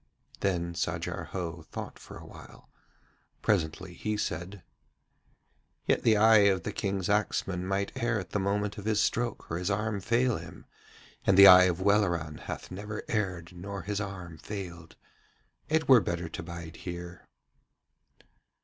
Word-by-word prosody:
Then 85 -3 -1
Sajar 85 - -3
Ho 85 -3 -5
thought - - -7
for - - -11
a - - -11
while. - - -14 0.7
Presently 90 -2 0
he 105 +5 -3
said: 90 0 -4 1.2
'Yet - - +2
the 110 -2 +4
eye 110 -1 +6
of 95 -1 0
the - - -3
King's 95 -3 -2
axeman 95 -3 0
might 100 +1 -1
err 115 -1 0
at 90 -2 -8
the 105 - 0
moment 105 +2 -1
of 100 - -9
his 110 -1 +1
stroke 120 -1 -1
or 80 - -1
his 90 +2 -2
arm 105 +1 -1
fail 120 +3 +2
him, - - -11 0.6
and 95 - +5
the 100 - +11
eye 90 -1 +10
of 90 0 0
Welleran 90 -6 +1
hath - - -7
never 105 +3 -6
erred 90 -6 -2
nor 100 +1 -6
his 100 +3 -2
arm 90 -5 -7
failed. 85 -5 -7 0.7
It 160 +1 +1
were 130 -4 +8
better 85 -1 -3
to - - -6
bide 85 -1 -8
here.' 85 0 -8
95 Hz, 155 wpm, -29 LUFS, 85-105 Hz, 1.2 s, the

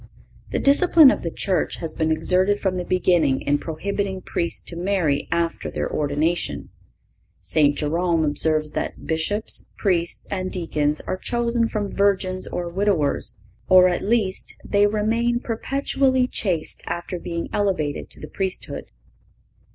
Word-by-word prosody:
The - - -2
discipline 295 0 +6
of - - -2
the 170 - -3
Church 185 +2 -1
has 160 -2 -6
been 160 0 0
exerted 185 +5 +2
from 185 -2 -1
the 180 - -2
beginning 175 -7 +2
in 145 0 +1
prohibiting 190 +4 -3
Priests 170 -1 -1
to 170 - -6
marry 175 -5 0
after 170 0 -1
their - - -3
ordination. 150 +4 -1 0.7
St. 145 -2 +2
Jerome 165 +1 +1
observes 155 +1 +3
that - - -4
"Bishops, 165 +7 -1
Priests 175 -4 0
and 185 -2 -3
Deacons 150 -4 -1
are 185 - -4
chosen 235 +2 0
from 205 -2 -3
virgins 190 -2 +1
or 175 -1 -4
widowers, 170 - 0 0.3
or, 185 0 +7
at 175 - -1
least, 205 -3 0
they 205 0 +3
remain 230 +3 0
perpetually 260 +2 0
chaste 180 -10 -1
after 175 +1 -4
being 170 0 -4
elevated 185 -8 -1
to - - -11
the 150 - -8
priesthood." 190 +1 -4
185 Hz, 140 wpm, -22 LUFS, 160-205 Hz, 0.7 s, or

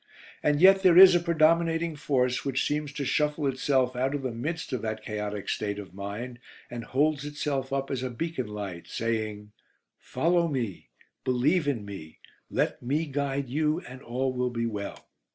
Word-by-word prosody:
And 150 -1 +2
yet 190 +2 +7
there 180 -3 +6
is 185 0 +11
a 175 - +5
predominating 165 0 +2
force 130 -4 0
which 135 -2 0
seems 150 -1 -1
to 140 -1 -3
shuffle 150 +2 +1
itself 130 -1 +1
out 130 +3 0
of 140 - -4
the 130 - -2
midst 150 +6 -4
of 125 - -1
that 110 -1 -4
chaotic 105 -2 -4
state 100 -1 -2
of 95 -4 -9
mind, 105 +6 -6 0.3
and 120 -1 -5
holds 145 +3 +1
itself 145 -2 -3
up 135 0 -2
as 130 -2 -2
a 130 - -2
beacon 130 -1 -3
light, 100 -5 -6
saying 110 -2 -3 0.5
"Follow 170 +5 +1
me, 120 - -3 0.3
believe 140 +6 +2
in 120 -8 -1
me, 95 -6 -9 0.3
let - - -1
me 145 +6 0
guide 140 -1 -2
you, 155 +6 0 0.2
all 130 +2 -1
will 125 0 0
be 115 -1 -2
well." 105 -3 -5
135 Hz, 170 wpm, -28 LUFS, 115-150 Hz, 0.5 s, is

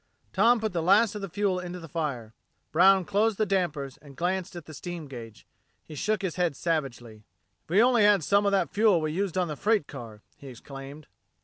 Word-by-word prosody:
Tom 230 +5 +4
put 220 -3 -3
the 170 - -1
last 200 +6 +4
of 210 - -6
the 195 - -5
fuel 195 0 0
into 180 0 -6
the 165 - -10
fire. 140 -9 -4 0.4
Brown 190 +3 +5
closed 210 +2 +1
the 215 - +1
dampers 160 -9 -2
and 140 -3 -16
glanced 185 +2 -2
at 170 -4 -8
the 155 - -11
steam 175 +1 -7
gauge. 115 -5 -10 0.4
He - - -11
shook 210 +7 -1
his 185 -3 -3
head 175 -5 0
savagely. 125 -9 -3 0.4
"If - - -34
we 195 +7 +5
only 245 -2 +4
had 205 -4 +5
some 200 +5 +2
of - - +2
that 190 -7 0
fuel 210 -4 +4
we 155 -1 -2
used 185 +2 -2
on 180 -1 +1
the 150 - -4
freight 210 +1 +1
car!" 110 -5 -10
he 140 - -12
exclaimed. 135 +3 -10
175 Hz, 215 wpm, -27 LUFS, 145-200 Hz, 0.4 s, Brown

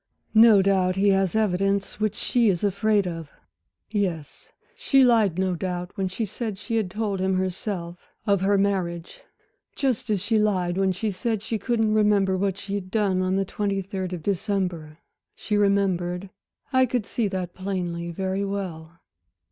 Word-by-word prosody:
"No 220 -3 +7
doubt 185 -2 +2
he 200 +1 +3
has 195 0 +2
evidence 195 -1 0
which 215 -2 0
she 235 -3 +2
is 180 -1 0
afraid 205 0 +2
of. 165 -3 -6 0.6
Yes, 180 -8 -3 0.2
she 285 - +3
lied 220 -8 +4
no 185 -1 +1
doubt 180 0 -4
when 195 -2 -1
she 190 +5 -3
said 215 0 -5
she 230 +3 -4
had 210 -5 0
told 205 0 -2
him 190 0 +1
herself 185 -2 -4 0.2
of 200 -3 +2
her 200 +1 +3
marriage, 180 -4 -1 0.5
just 255 -4 -1
as 210 -2 +1
she 215 +3 +1
lied 185 -4 +1
when 190 0 +2
she 205 +4 -2
said 215 +2 -2
she 220 0 -2
couldn't 220 -1 +1
remember 205 -3 +3
what 195 0 -1
she 200 0 -6
had 195 -2 -3
done 195 -3 +1
on 185 0 0
the 195 0 +1
twenty 200 0 -2
third 190 -1 -4
of 175 -4 -5
December. 180 -5 -2 0.4
She 210 - -2
remembered 195 -2 +1 0.4
I 260 0 +4
could 245 -3 -1
see 225 0 -1
that 185 -2 -4
plainly 175 -3 -3
very 190 +3 -2
well." 170 -5 -5
195 Hz, 170 wpm, -25 LUFS, 185-210 Hz, 0.6 s, No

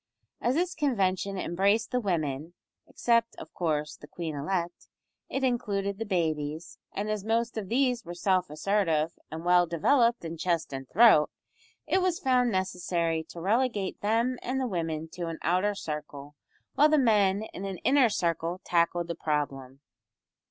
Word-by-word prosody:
As 245 +2 +1
this 355 +2 0
convention 200 - 0
embraced 195 +5 +1
the 250 - +1
women 165 - -2 0.3
(except, 230 -1 +1
of - - -11
course, 150 -3 -1
the 150 - -14
queen 160 +1 -5
elect), 175 +4 -3 0.4
it 270 - -2
included 200 -6 -1
the 225 - -3
babies, 160 -3 -2
and 205 +2 -3
as 215 -2 -2
most 230 +2 0
of 210 -4 -4
these 250 -1 +1
were 175 -2 -8
self 185 0 +1
assertive 165 -1 +1 0.2
and 160 +2 -7
well 175 0 +5
developed 235 - +2
in 165 0 -5
chest 165 -3 -1
and 135 -1 -6
throat, 215 -8 +6 0.6
it 380 - +2
was 365 -2 +1
found 250 -2 +2
necessary 175 -4 -1
to 170 - -10
relegate 210 +1 0
them 230 +4 +1
and 260 +2 -2
the 260 - 0
women 165 -6 -3
to 175 +1 -5
an 165 -1 -4
outer 185 +5 +1
circle, 150 -4 -6 0.4
while 300 +2 +5
the 305 - +4
men 210 -6 +3
in 195 - -6
an 195 -2 -4
inner 265 -3 +5
circle 170 -2 -1
tackled 170 0 +1
the 170 - -2
problem. 140 -4 -3
185 Hz, 160 wpm, -28 LUFS, 165-230 Hz, 0.6 s, throat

